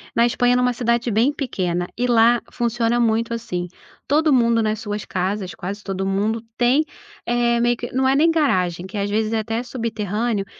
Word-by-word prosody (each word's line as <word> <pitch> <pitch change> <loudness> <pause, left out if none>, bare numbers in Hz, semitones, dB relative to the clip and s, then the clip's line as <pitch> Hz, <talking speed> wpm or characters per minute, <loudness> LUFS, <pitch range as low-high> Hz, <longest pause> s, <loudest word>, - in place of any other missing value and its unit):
Na 230 - +4
Espanha 245 +1 +2
numa 250 0 +2
cidade 235 0 0
bem 235 +6 +2
pequena, 180 -11 -2
e 245 - 0
lá 235 0 +4
funciona 240 0 0
muito 230 0 +1
assim, 180 -7 -4 0.4
todo 305 +2 +3
mundo 235 -3 +3
nas 215 0 -1
suas 210 -2 -4
casas, 190 0 -3
quase 200 +3 -6
todo 190 -1 -3
mundo 210 +4 0 0.2
tem, 255 +6 +3 0.4
eh, 240 0 +1
meio 240 +1 +2
que 240 +1 -7
não 260 +1 +1
é 265 - +3
nem 320 +4 +4
garagem, 185 - +1
que 190 - -7
às 200 0 -1
vezes 215 +1 0
é 225 - +1
até 225 +2 -2
subterrâneo, 225 -3 -2
230 Hz, 185 wpm, -21 LUFS, 205-240 Hz, 0.4 s, Na